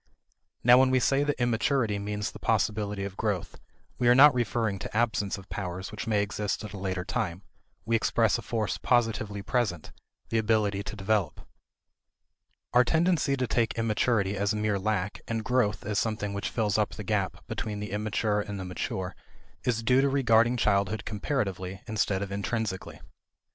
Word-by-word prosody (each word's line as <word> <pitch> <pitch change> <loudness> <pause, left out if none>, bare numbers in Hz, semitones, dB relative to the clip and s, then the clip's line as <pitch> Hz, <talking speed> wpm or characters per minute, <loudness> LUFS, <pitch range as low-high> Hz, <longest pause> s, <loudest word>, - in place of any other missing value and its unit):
Now 125 +1 +8
when 130 0 +5
we 130 0 +3
say 135 +3 +2
that 145 -3 -1
immaturity 120 -2 +1
means 105 0 -3
the - - -11
possibility 105 -1 0
of 100 -1 -5
growth, 100 -5 -2 0.4
we 120 - +2
are 120 - +7
not 145 +2 +8
referring 110 -4 -1
to 105 - -5
absence 110 -4 +1
of 95 0 -12
powers 95 -1 -5
which 110 +2 -6
may 105 -2 +2
exist 105 +1 -3
at 105 -1 -7
a - - -6
later 95 -2 -3
time; 90 +2 -2 0.4
we 115 +1 +1
express 110 - +2
a - - -6
force 110 -3 -2
positively 110 -4 0
present 105 - -1 0.4
the 115 - +1
ability 105 -2 +1
to 100 - -6
develop. 105 -1 0 1.3
Our 125 +1 +6
tendency 160 -1 +2
to 130 - 0
take 115 -2 0
immaturity 110 -2 +1
as 100 +2 0
mere 105 -1 0
lack, 105 -1 -2
and 115 -1 -2
growth 105 -7 +1
as 105 +1 0
something 110 -3 -2
which 100 +1 -3
fills 110 -3 0
up 105 - 0
the 105 - -6
gap 100 -2 -2
between 105 -1 -4
the 105 -2 -5
immature 105 0 0
and 100 -1 -5
the 95 - -5
mature 90 0 -4 0.5
is 115 -2 0
due 130 +3 +4
to 140 - +2
regarding 120 -3 +3
childhood 100 -1 +1
comparatively, 100 -5 -2
instead 105 -3 0
of 100 - -6
intrinsically. 100 -1 -3
105 Hz, 175 wpm, -28 LUFS, 100-115 Hz, 1.3 s, Now